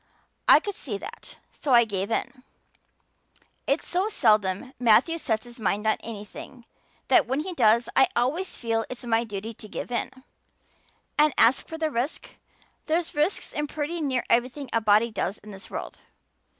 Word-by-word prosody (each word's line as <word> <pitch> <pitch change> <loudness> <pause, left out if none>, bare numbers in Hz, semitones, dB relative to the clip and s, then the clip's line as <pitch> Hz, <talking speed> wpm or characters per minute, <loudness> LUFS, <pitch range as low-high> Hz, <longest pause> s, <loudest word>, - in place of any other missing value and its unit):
I - - +9
could 410 - -5
see 225 - -5
that, 465 - -10
so 275 - -2
I 235 -1 +7
gave 200 -1 -3
in. 255 +3 -3 1.3
It's 280 +3 +1
so 370 +4 0
seldom 215 - +1
Matthew 250 +8 +4
sets 220 -7 -1
his 240 -1 -12
mind 210 0 -1
on 220 - +3
anything 230 +3 -9 0.4
that 325 -9 +4
when 265 +4 0
he 365 +3 -5
does 235 -4 +3
I 265 - +6
always 300 +11 0
feel 225 -1 -1
it's 250 -1 -7
my 230 -1 +2
duty 215 0 -6
to 215 - -11
give 230 - -6
in. 235 - -1 1.1
And 300 -2 +4
as 245 +4 +5
for 320 - -8
the 315 -1 -1
risk, 255 +4 -3 0.6
there's 325 +2 0
risks 300 +6 0
in 295 0 -2
pretty 310 +3 -3
near 265 -4 0
everything 255 +3 0
a 230 - +2
body 215 +2 +4
does 200 -1 -2
in 210 - -13
this 195 -1 -11
world. - - -7
240 Hz, 170 wpm, -26 LUFS, 220-295 Hz, 1.3 s, I